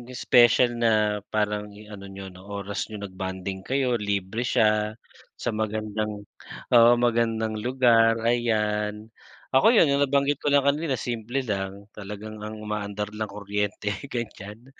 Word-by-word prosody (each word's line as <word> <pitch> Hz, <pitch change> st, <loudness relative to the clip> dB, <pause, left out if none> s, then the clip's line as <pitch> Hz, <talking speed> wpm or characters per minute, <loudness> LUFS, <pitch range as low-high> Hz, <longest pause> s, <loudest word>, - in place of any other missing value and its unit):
special 120 Hz, 0 st, +5 dB
na 110 Hz, -3 st, +2 dB
parang 105 Hz, -1 st, -1 dB
ano 105 Hz, -1 st, -11 dB
niyo 95 Hz, 0 st, -8 dB
'no, 90 Hz, 0 st, -13 dB
oras 100 Hz, +1 st, -4 dB
niyo, 110 Hz, -, -7 dB
nag-bonding 95 Hz, 0 st, -5 dB
kayo, 130 Hz, -1 st, 0 dB
libre 100 Hz, +2 st, -2 dB
siya, 110 Hz, -3 st, +2 dB, 0.4 s
sa -, -, -3 dB
magandang 110 Hz, -1 st, -3 dB, 0.5 s
oo, 115 Hz, 0 st, +8 dB
magandang 115 Hz, -2 st, +1 dB
lugar, 115 Hz, -2 st, +4 dB
ayan. 105 Hz, -3 st, 0 dB, 0.4 s
Ako, 135 Hz, +7 st, +5 dB
yun 155 Hz, -9 st, +5 dB
yung 140 Hz, -, +2 dB
nabanggit 140 Hz, +1 st, +1 dB
ko -, -, -4 dB
lang 140 Hz, -1 st, +4 dB
kanila 140 Hz, 0 st, +1 dB
simple 120 Hz, +3 st, -3 dB
lang, 100 Hz, -3 st, -4 dB
talagang 105 Hz, +1 st, -8 dB
ang 105 Hz, +1 st, -6 dB
umaandar 105 Hz, -1 st, -4 dB
lang 110 Hz, 0 st, -3 dB
kuryente, 105 Hz, 0 st, -3 dB, 0.2 s
ganyan. 115 Hz, +1 st, -7 dB
110 Hz, 135 wpm, -25 LUFS, 105-120 Hz, 0.5 s, oo